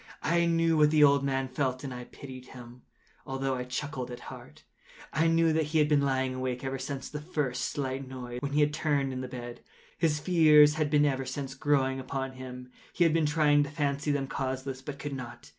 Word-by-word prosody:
I 170 +1 +2
knew 165 -1 +2
what 150 -1 +5
the 150 -1 +5
old 140 -1 +5
man 135 -1 0
felt, 130 0 -2
and 135 -2 -5 0.2
pitied 130 -2 -10
him, 125 -1 -12 0.4
although 135 0 -2
I 125 -1 -3
chuckled 130 0 -4
at 125 - -7
heart. - - -12 0.5
I 160 +2 +2
knew 165 0 +3
that 160 0 +1
he 155 +2 -1
had 150 -1 +4
been 150 -1 +3
lying 130 -1 0
awake 130 0 -3
ever 135 0 -3
since 135 +1 -5
the 150 0 -6
first 150 -6 -2
slight 135 -1 -3
noise, 125 -2 -6
when 140 0 -3
he 150 - +3
had 150 0 +2
turned 145 -4 0
in 130 - -4
the 130 - -5
bed. 120 -1 -8 0.4
His 155 -3 +2
fears 150 -3 +6
had 155 -1 0
been 150 0 +4
ever 135 -2 0
since 135 -2 -4
growing 135 -1 +1
upon 135 0 -4
him. 125 -1 -9 0.2
He 175 - +2
had 165 -2 +4
been 165 -2 +2
trying 150 -1 +4
to 145 - -1
fancy 145 0 -1
them 140 -1 0
causeless, 130 0 -4
but 140 +1 -7
could 145 0 -5
not. 120 -2 -8
140 Hz, 215 wpm, -29 LUFS, 130-150 Hz, 0.5 s, fears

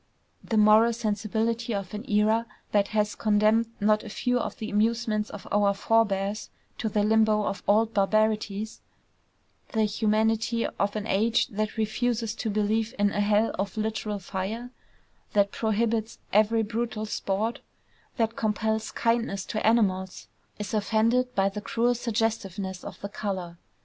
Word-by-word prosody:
The 225 - -1
moral 215 +2 +6
sensibility 225 +1 -1
of 195 -1 -5
an 215 +6 -6
era 215 +2 +2 0.2
that 200 -1 +3
has 210 -1 0
condemned 215 +1 +3
not 215 0 +3
a 220 - -8
few 245 +3 0
of - - -4
the 220 - -5
amusements 215 0 +1
of 205 - -9
our 200 -1 +3
forebears 205 -1 +1 0.3
to 220 - -1
the 210 0 +1
limbo 215 0 +3
of 200 - -3
old 220 +2 +3
barbarities, 215 0 0 0.9
the 220 -1 +2
humanity 220 +2 +1
of 200 +1 -2
an 210 -1 -3
age 225 +3 +2
that 215 +1 -3
refuses 225 0 0
to 225 - -2
believe 215 +3 0
in 205 0 +2
a - - -2
hell 210 +2 +2
of 195 +1 -3
literal 215 -1 -2
fire, 200 +6 -5 0.6
that 200 -1 +3
prohibits 220 0 -1 0.2
every 215 +2 +4
brutal 220 0 -3
sport, 210 +2 -2 0.6
that 225 -1 0
compels 220 0 -1
kindness 230 -4 0
to 215 - -3
animals, 190 -5 +1 0.3
is 210 +1 -5
offended 230 +4 +1
by 195 0 +3
the 200 +1 -4
cruel 235 +3 +1
suggestiveness 210 -6 -2
of - - -8
the 200 - -5
color. 185 -5 -4
215 Hz, 145 wpm, -27 LUFS, 205-225 Hz, 0.9 s, moral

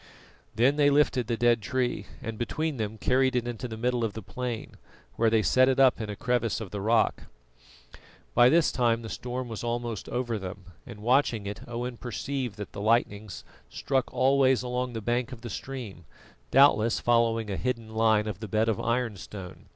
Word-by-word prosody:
Then 130 +6 +3
they 145 -1 +5
lifted 140 -4 +2
the 115 - -1
dead 120 -1 +3
tree, 120 -1 -2 0.2
and 115 0 -4
between 155 +5 -2
them 110 -1 -3
carried 130 +3 +2
it 120 -1 0
into 120 +1 -4
the 110 -2 -7
middle 120 +1 0
of 110 -3 -1
the 110 - -7
plain, 125 -3 -5 0.4
where 115 0 +3
they 110 -1 +2
set 130 +4 +4
it 135 0 +1
up 130 -3 +5
in 110 - -4
a 105 - -4
crevice 115 -1 0
of 110 -4 -7
the 100 - -4
rock. 115 +2 +2 1.1
By 120 +1 +6
this 165 +2 +4
time 120 -2 +1
the 110 - -6
storm 125 +2 -4
was 115 -1 -6
almost 120 -2 -3
over 120 -3 -2
them, 95 0 -8 0.2
and 105 0 -10
watching 120 -3 +2
it 100 +1 -5
Owen 120 +1 -4
perceived 125 -1 -4
that 105 - -7
the 100 - -7
lightnings 110 -2 0 0.3
struck 135 -2 -1
always 130 -1 +3
along 125 0 -2
the 115 - -4
bank 120 +3 -1
of 120 -3 -9
the 120 -2 -7
stream, 115 -9 -7 0.4
doubtless 125 -5 +5
following 115 -2 +2
a - - -1
hidden 115 -1 -3
line 110 -1 +3
of 105 -4 -5
the 110 - -6
bed 110 +3 +1
of 110 - 0
ironstone. 105 -6 -4
120 Hz, 190 wpm, -27 LUFS, 110-125 Hz, 1.1 s, By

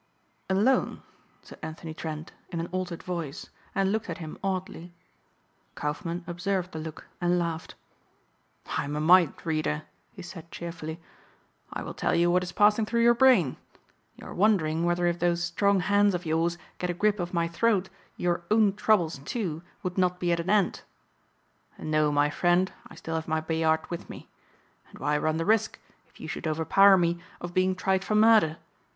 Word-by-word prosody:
"Alone," 210 +8 +2 0.4
said - - -13
Anthony 160 0 -7
Trent 155 0 -6 0.2
in 170 - -4
an 165 - -2
altered 180 -2 -4
voice 170 -1 -5 0.2
and 195 0 +2
looked 220 +1 -2
at - - -4
him 160 -4 -7
oddly. 185 -2 -4 0.8
Kaufmann 170 +4 -3
observed 180 +1 -2
the 160 - -6
look 155 -1 -8 0.2
and 175 0 +2
laughed. 165 -2 -3 1.0
"I - - -1
am 145 +1 -4
a - - -1
mind 170 0 +5
reader," 155 - -1 0.3
he - - -10
said 175 -2 -10
cheerfully, 165 -2 -6 0.7
"I - - -4
will - - -6
tell - - 0
you 175 +1 +3
what 180 +1 +3
is 180 - -5
passing 210 +2 +4
through 235 +1 +1
your 235 0 +7
brain. 235 - +4 0.6
You - - -13
are - - -8
wondering 170 -5 +2
whether 175 0 +1
if 175 0 0
those 175 0 +1
strong 195 +3 +2
hands 205 0 +3
of 175 0 -4
yours 165 +2 0 0.2
get 180 - -2
a 175 - -1
grip 210 +2 +1
of 175 0 -3
my 170 -1 0
throat 195 +2 +1 0.3
your 175 -1 0
own 215 -2 +4
troubles, 175 -10 +2
too, 165 - -3 0.2
would 185 0 -2
not 180 -1 +1
be 175 -1 0
at 170 - +1
an 170 +2 -3
end. 205 -3 +2 1.0
No, 155 -1 +1
my 145 0 +2
friend, 175 +3 +2
I - - -14
still 165 0 -6
have 160 0 -2
my 160 0 +1
Bayard 160 0 +1
with 170 - -6
me. - - -10 0.6
And - - -14
why 145 +3 0
run 155 +1 0
the 165 - -1
risk, 220 0 +2 0.3
if - - -23
you - - -7
should - - -4
overpower 165 +5 +5
me, 170 -1 +1 0.2
of 175 0 -7
being 185 +1 +2
tried 190 0 0
for 215 - -1
murder? 215 -7 +5
175 Hz, 180 wpm, -27 LUFS, 160-190 Hz, 1.0 s, your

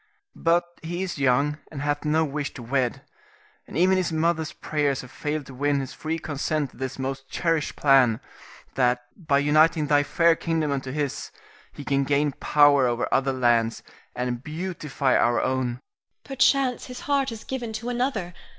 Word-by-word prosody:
But 170 +1 +2 0.2
he 175 +3 -3
is 180 -6 -4
young, 140 +3 +2
and 145 -2 -5
hath 145 +1 -1
no 160 +1 +2
wish 145 0 -4
to 125 - -8
wed, 130 +2 -1 0.6
and - - -6
even 185 +2 +4
his 185 -2 0
mother's 160 -1 0
prayers 145 -3 -1
have 125 - -12
failed 150 -1 -3
to 135 - -11
win 140 +2 +1
his 135 -2 -5
free 160 +1 -3
consent 150 -2 -2
to - - -19
this 130 0 -4
most 135 0 -4
cherished 165 -3 -1
plan, 130 -5 +4 0.5
that 125 -1 +2
by 155 -5 +1
uniting 155 +2 +4
thy 145 -1 +4
fair 165 +3 +3
kingdom 160 -3 -1
unto 135 -2 -3
his, 145 -1 -3 0.4
he 145 - -10
can 140 0 +1
gain 145 +1 +1
power 145 -1 +4
over 120 0 -1
other 135 0 +2
lands 120 -3 +1 0.3
and 125 0 -3
beautify 150 -4 -2
our 120 0 +3
own. 130 0 0
Irene. 120 +1 -6 0.4
Perchance 270 -1 +2
his 250 -1 -8
heart 275 -2 0
is 225 -1 -8
given 245 -4 -4
to 225 +3 -4
another. 240 -8 -2
145 Hz, 175 wpm, -25 LUFS, 135-165 Hz, 0.6 s, even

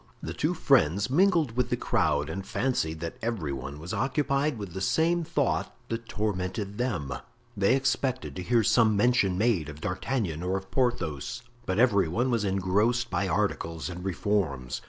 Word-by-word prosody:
The - - -4
two - - 0
friends 95 +10 +3
mingled 165 - +3
with 125 -1 +1
the - - 0
crowd 75 -1 +1
and 95 +5 -4
fancied 80 -11 -1
that 85 -1 -5
every 105 -12 -2
one 70 +2 -6
was 85 +4 -6
occupied 140 +1 0
with 100 -5 -7
the 95 - -5
same 170 - +2
thought - - -1
that 115 0 -4
tormented 100 0 -3
them. 105 - -1 0.4
They 100 +5 +3
expected 130 -1 -1
to 90 - -4
hear 115 +5 +2
some 110 -1 +4
mention 105 -5 +3
made 100 -8 +1
of 75 0 -9
D'Artagnan 90 - -2
or 90 +2 0
of 95 0 -9
Porthos, 120 - -1 0.2
but 95 - 0
every 105 -7 +4
one 120 +10 0
was 115 -3 +1
engrossed 105 +5 +1
by 100 - 0
articles 80 0 -1
and 90 0 -7
reforms. 85 -10 -1
100 Hz, 170 wpm, -28 LUFS, 85-120 Hz, 0.4 s, some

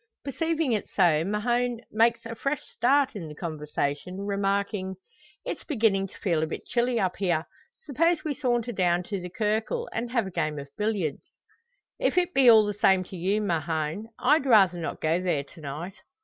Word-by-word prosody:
Perceiving 320 0 -1
it 215 -3 -1
so, 165 -5 +3
Mahon 240 +4 0
makes 230 +1 +2
a 230 - -5
fresh 275 +5 -2
start 275 +2 +2
in 175 -6 -6
the 150 - -9
conversation, 150 +2 -3
remarking 200 -1 -1 0.5
"It's - - -4
beginning 215 - +1
to - - -16
feel 170 -5 0
a 160 - 0
bit - - -6
chilly 240 0 0
up 185 -3 0
here. 175 -5 0 0.4
Suppose 330 +4 +1
we 305 - -1
saunter 245 -4 0
down 180 -4 +1
to 195 +1 -4
the 180 - -6
Cercle, 220 - 0
and 235 +1 -3
have 235 -3 0
a 190 - -6
game 155 -3 -1
of 140 0 -7
billiards!" 205 -9 -2 0.6
"If - - 0
it 360 0 +2
be 265 -3 +6
all 220 -2 +8
the 205 - -2
same 190 -2 +3
to 185 - -10
you, 195 +5 0
Mahon, 165 +3 -2
I'd 300 -2 +3
rather 195 -7 +5
not 165 - -5
go 160 +3 +1
there 175 -6 0
to 160 +4 -16
night." 155 +6 -6
200 Hz, 185 wpm, -27 LUFS, 175-240 Hz, 0.6 s, all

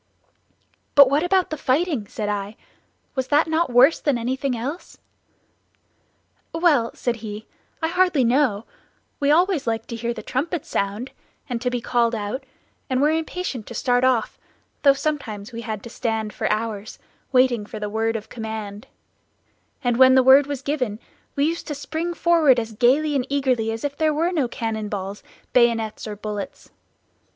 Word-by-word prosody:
"But 280 -2 +8
what 285 +2 +3
about 365 0 +1
the 310 - -4
fighting?" 280 - 0
said 210 0 -4
I, 205 0 -3 0.6
"was 260 -2 -2
not 300 +2 +4
that 320 0 +1
worse 250 +6 +5
than 285 -4 +1
anything 255 +2 -2
else?" 280 +10 -6 1.6
"Well," 315 -9 +3
said 240 -2 -2
he, 215 -1 -7 0.4
"I - - +3
hardly 360 -5 +2
know; 235 -3 +2 0.5
we 285 - +1
always 340 -2 +3
liked 225 0 -2
to 230 - -4
hear 235 +1 -2
the 240 - -6
trumpet 300 +5 -2
sound, 205 +6 -2 0.4
and 240 -3 -3
to 250 - 0
be 245 -1 -2
called 235 -1 +1
out, 220 +6 -4 0.4
and 255 -1 +1
were 295 +3 +4
impatient 320 - -3
to 235 - -8
start 245 +2 +1
off, 255 -4 +1 0.4
though 280 -2 +6
sometimes 265 -9 -4
we 230 0 -6
had 215 -3 -5
to 235 - -8
stand 220 -4 -2
for - - -1
hours, 215 -1 -3 0.3
waiting 255 -4 +3
for 215 - -7
the 210 - -3
word 225 +2 -1
of 215 -1 -5
command; 220 -3 -6 1.0
and 245 -2 +1
when 260 0 +7
the 260 - +6
word 270 +2 +7
was 280 -2 -4
given 255 -8 -1 0.4
we 280 - +2
used 330 +2 -2
to 295 - -3
spring 320 +5 -4
forward 320 -8 +4
as 225 -1 -5
gayly 275 +7 +3
and 265 -1 0
eagerly 255 -5 +1
as 225 0 -5
if 285 -1 -2
there 310 -2 +2
were 335 +4 +1
no 300 -8 +1
cannon 220 -2 -3
balls, 200 0 -5 0.3
bayonets, 230 -3 +2
or 210 - -5
bullets. 210 -1 -6
250 Hz, 170 wpm, -23 LUFS, 225-290 Hz, 1.6 s, But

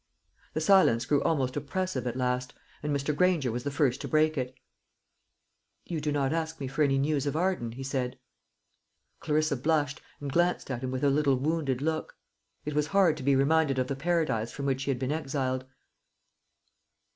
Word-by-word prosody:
The 155 - 0
silence 155 -10 +5
grew 145 +2 +2
almost 135 -5 0
oppressive 145 -3 -2
at 120 - -3
last, 125 0 -1 0.3
and 150 - -2
Mr. 140 +1 0
Granger 165 -7 +2
was 120 +2 -3
the 145 - -1
first 140 -2 +1
to - - -4
break 155 0 +3
it. 130 -2 -3 1.3
"You 165 -3 -3
do 150 - -1
not 140 0 +1
ask 160 0 -2
me 135 - -3
for 140 +4 -3
any 135 -2 +3
news 145 0 0
of 145 - -1
Arden," 170 -9 0
he 135 +3 -7
said. 130 -2 -2 1.0
Clarissa 155 -1 +1
blushed, 145 +1 0 0.2
and 140 -2 -5
glanced 175 -3 +1
at 125 -2 -3
him 130 - -3
with 130 +1 -3
a 140 - +4
little 140 -1 +3
wounded 140 -1 -1
look. 160 0 -2 0.5
It 150 - -3
was 150 0 +1
hard 190 -3 +4
to - - -7
be 140 +1 +3
reminded 140 0 +3
of 130 - +1
the 135 - -3
paradise 145 -7 0
from 140 - -5
which 135 -1 0
she 135 - -3
had 135 - +1
been 130 +2 -2
exiled. 135 -4 -2
140 Hz, 190 wpm, -29 LUFS, 130-155 Hz, 1.3 s, silence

